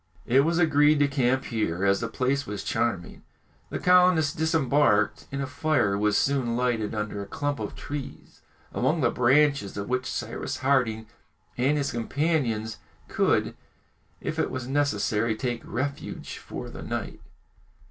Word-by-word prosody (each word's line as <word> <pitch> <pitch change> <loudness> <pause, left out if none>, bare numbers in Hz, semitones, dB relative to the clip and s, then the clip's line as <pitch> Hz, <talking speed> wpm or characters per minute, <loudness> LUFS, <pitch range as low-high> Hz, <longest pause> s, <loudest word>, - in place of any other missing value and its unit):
It 125 +3 +4
was 165 +4 +2
agreed 150 -3 +4
to 145 0 +3
camp 130 -1 +1
here, 100 -7 -1
as 100 0 +3
the 115 - -2
place 135 +4 -1
was 100 -1 -5
charming. 95 -7 -2 0.5
The - - -3
colonists 180 -5 +4
disembarked, 145 -9 +2
and 140 0 -2
a - - -1
fire 140 -7 +1
was 105 +1 +2
soon 130 -4 +1
lighted 120 -4 0
under 105 -1 -3
a 100 - -7
clump 145 +7 -2
of - - -5
trees, 145 -2 -8 0.3
among 160 0 +1
the 120 - +3
branches 135 -4 +2
of 100 +2 -4
which 130 0 -1
Cyrus - - -4
Harding 125 -5 +1 0.5
and 135 +4 +2
his 140 -1 -1
companions 120 -4 -1 0.3
could, - - +1 0.6
if - - -4
it - - +1
was 130 -1 -5
necessary, 115 -5 +1
take 120 0 -3
refuge 140 +3 -5
for - - -7
the - - -9
night. - - -5
130 Hz, 150 wpm, -26 LUFS, 110-145 Hz, 0.6 s, It